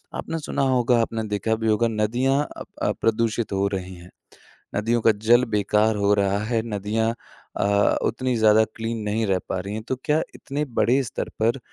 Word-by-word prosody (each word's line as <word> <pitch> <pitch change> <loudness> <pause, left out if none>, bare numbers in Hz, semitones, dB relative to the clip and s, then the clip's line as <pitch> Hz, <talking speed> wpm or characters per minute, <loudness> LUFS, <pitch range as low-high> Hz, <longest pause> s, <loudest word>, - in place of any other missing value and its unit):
आपने 165 - -4
सुना 150 - -3
होगा, 125 -3 +3
आपने 115 0 -2
देखा 105 +2 0
भी 110 0 -3
होगा, 110 +2 +3
नदियाँ 120 +6 +1 0.2
अ - - -6 0.2
अ, - - +2
प्रदूषित 115 0 0
हो 100 +1 +1
रही 95 -2 -5
हैं। 90 +1 -13 0.7
नदियों 115 +3 +1
का 110 - +5
जल 120 +2 +6
बेकार 105 +1 +2
हो 100 0 +2
रहा 100 -1 +1
है, 115 +1 0
नदियाँ 110 +3 0 0.4
अ, 100 0 +2
उतनी 125 +1 -1
ज़्यादा 110 0 +5
क्लीन 115 0 -3
नहीं 110 +2 0
रह 95 -1 +1
पा 95 - -1
रही 100 +2 -5
हैं। 110 - -5
तो 130 - -1
क्या 155 0 +2
इतने 145 +2 -3
बड़े 130 +4 +3
स्तर 110 - -4
पर 115 +4 +1
110 Hz, 190 wpm, -23 LUFS, 105-120 Hz, 0.7 s, जल